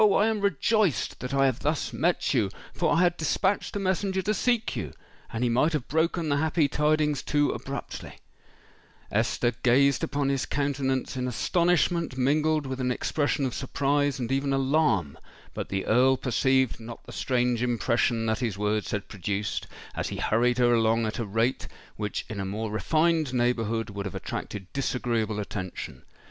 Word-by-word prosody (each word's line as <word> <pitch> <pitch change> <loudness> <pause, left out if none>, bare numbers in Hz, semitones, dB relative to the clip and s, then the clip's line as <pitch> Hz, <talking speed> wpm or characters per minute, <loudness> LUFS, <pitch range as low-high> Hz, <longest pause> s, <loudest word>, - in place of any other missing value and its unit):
I 210 -1 +5
am 220 -2 0
rejoiced 200 - +1
that 125 - -5
I 135 0 +3
have 130 -1 +1
thus 145 -5 -1
met 165 +8 +1
you—for 110 -7 -1
I 170 - +3
had 175 -1 +3
dispatched 190 +7 0
a - - 0
messenger 190 0 0
to 210 +3 +1
seek 235 +2 0
you—and 115 +2 -7
he - - +3
might 150 +7 +2
have 150 -5 -2
broken 160 +2 0
the 145 -1 +2
happy 155 0 +2
tidings 150 0 +1
too 145 -1 +1
abruptly——" 140 +1 -6 0.9
Esther 115 +3 +1
gazed 140 +3 +4
upon 140 -1 0
his 135 -1 0
countenance 140 -2 -1
in 125 0 -2
astonishment 170 +2 +1
mingled 150 +3 +2
with 130 0 -4
an 125 - 0
expression 145 +2 0
of 125 - -2
surprise 140 +1 0
and 120 -2 -3
even 135 +1 +1
alarm: 135 - +1 0.3
but - - -5
the 95 -1 -2
Earl 130 +3 +4
perceived 130 0 +1
not 115 0 -9
the - - -10
strange 125 -2 0
impression 120 -1 +1
that 110 -1 0
his 115 -6 -2
words 105 +1 -1
had 105 -1 -3
produced, 100 +1 -3 0.3
as - - -2
he - - -5
hurried 120 +3 +2
her 120 -1 +4
along 115 0 +3
at 110 - -3
a 115 - -1
rate 115 +5 0 0.3
which 105 -1 -3
in 110 - -6
a - - -1
more 105 +3 -3
refined 155 +4 +1
neighbourhood 115 -2 0
would 100 0 -4
have 95 - -8
attracted 100 -2 -5
disagreeable 120 -5 -1
attention. 95 -3 -6
130 Hz, 170 wpm, -27 LUFS, 115-150 Hz, 0.9 s, I